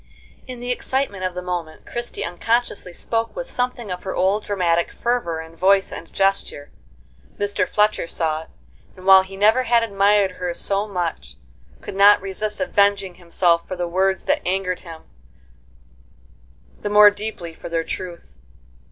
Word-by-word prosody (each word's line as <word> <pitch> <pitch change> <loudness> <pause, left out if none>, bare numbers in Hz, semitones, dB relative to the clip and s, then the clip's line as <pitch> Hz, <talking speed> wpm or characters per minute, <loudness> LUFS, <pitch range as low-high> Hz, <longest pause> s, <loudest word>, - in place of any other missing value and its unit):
In 250 -1 -7
the 245 +1 -3
excitement 250 -6 -1
of 185 -1 -3
the 180 - -5
moment 175 -3 -5
Christie 240 0 -4
unconsciously 210 +2 -1
spoke 230 +6 -3
with - - -5
something 245 -4 -2
of 180 - -4
her 190 - -5
old 195 +3 +1
dramatic 170 -4 0
fervor 235 -9 -1
in 160 0 -12
voice 195 +3 +3
and 165 - -9
gesture; 195 -7 -1 0.7
Mr. 205 -2 0
Fletcher 210 -4 +1
saw 160 -2 -1
it, 160 - -15 0.5
and, 185 - -12
while 190 0 +8
he 190 +1 -10
never 215 +5 +4
had 235 -2 +3
admired 200 -2 +3
her 180 -1 -4
so 200 +1 0
much, 175 - -4 0.5
could - - -8
not 200 +1 +7
resist 210 +2 -4
avenging 200 -7 +2
himself 170 0 +1
for 185 - -4
the 175 -1 -2
words 190 +2 0
that - - +1
angered 185 0 -1
him, 165 -3 -11 1.8
the 205 - -2
more 210 0 +8
deeply 205 -5 -5
for - - -9
their 165 0 -1
truth. 170 - -7
195 Hz, 160 wpm, -21 LUFS, 175-210 Hz, 1.8 s, while